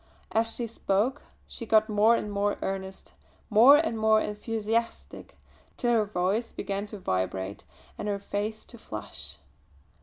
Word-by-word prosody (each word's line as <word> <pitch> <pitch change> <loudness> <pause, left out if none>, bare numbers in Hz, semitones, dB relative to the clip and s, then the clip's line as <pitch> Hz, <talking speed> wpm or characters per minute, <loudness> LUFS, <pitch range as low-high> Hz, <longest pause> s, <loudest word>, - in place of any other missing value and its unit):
As 225 +1 +2
she 240 - -2
spoke 230 +4 0 0.2
she 230 - -8
got 215 0 +4
more 215 +2 +4
and 210 - -3
more 205 0 0
earnest, 190 0 -5 0.4
more 240 +7 +8
and 300 -8 0
more 220 0 +4
enthusiastic, 225 +2 -3 0.4
till 240 - +1
her 220 -2 +3
voice 200 +4 -1
began 200 +1 -3
to 210 - -7
vibrate 95 - -3 0.3
and 210 - -3
her 205 -1 0
face 205 +2 -4
to 235 - -13
flush. 110 - -8
210 Hz, 145 wpm, -28 LUFS, 200-225 Hz, 0.4 s, more